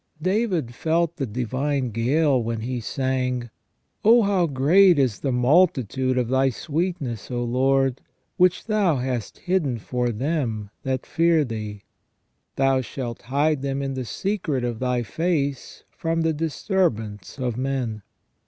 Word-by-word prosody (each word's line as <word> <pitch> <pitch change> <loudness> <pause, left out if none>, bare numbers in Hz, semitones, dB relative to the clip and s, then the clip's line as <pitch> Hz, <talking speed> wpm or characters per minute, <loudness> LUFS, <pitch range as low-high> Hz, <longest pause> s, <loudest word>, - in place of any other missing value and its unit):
David 185 - 0
felt 165 +4 0
the 135 - -2
divine 130 +3 -1
gale 130 +4 +2
when 115 -1 -3
he 125 +2 -3
sang: 125 -2 -2 0.2
" - - -48
Oh, 230 +2 +6
how 195 -4 +2
great 165 +6 +5
is 130 -7 +1
the 135 - -1
multitude 130 - +2
of 125 -2 +1
Thy 130 +2 +3
sweetness, 150 - -3
O 120 -1 -2
Lord, 135 +2 +1 0.3
which 180 0 +3
Thou 210 -7 +2
hast 125 -4 -3
hidden 175 -9 0
for 125 +2 -2
them 115 -4 -2
that 130 -1 -2
fear 165 -1 +3
Thee!... 110 -4 -6 0.7
Thou 135 -1 +2
shalt 120 -2 -6
hide 145 +3 +1
them 140 0 -2
in 135 0 -2
the 130 -1 -3
secret 165 - -2
of 120 -2 -2
Thy 125 -1 0
face, 145 - -2
from 165 0 -1
the 160 0 +1
disturbance 150 - -1
of 125 -4 -2
men." 125 -4 -2
135 Hz, 145 wpm, -24 LUFS, 120-160 Hz, 0.7 s, Oh